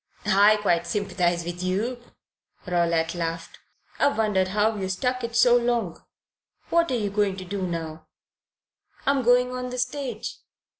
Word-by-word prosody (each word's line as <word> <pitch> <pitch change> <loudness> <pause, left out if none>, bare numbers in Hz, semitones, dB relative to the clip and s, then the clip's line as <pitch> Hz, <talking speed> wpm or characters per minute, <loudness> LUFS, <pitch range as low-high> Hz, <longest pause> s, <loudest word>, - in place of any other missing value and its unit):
"I 210 +1 +5
quite 175 -4 +1
sympathize 175 -4 0
with 175 +1 -5
you," 215 +7 -2 0.6
Rowlatt 170 -2 +1
laughed. 165 -1 -5 0.4
"I've 285 - +2
wondered 205 -4 +2
how 210 +3 +1
you 190 -2 -3
stuck 250 +6 -1
it 235 0 -4
so 240 0 +6
long. 235 -7 0 0.7
What 335 -1 +3
are 255 - 0
you 205 -3 -2
going 200 -2 0
to 185 - -7
do 195 +2 -4
now?" 160 -2 -5 1.0
"I'm 280 -1 +2
going 250 +1 +3
on 250 0 -4
the 250 - -6
stage." 250 -2 -3
205 Hz, 150 wpm, -25 LUFS, 175-245 Hz, 1.0 s, so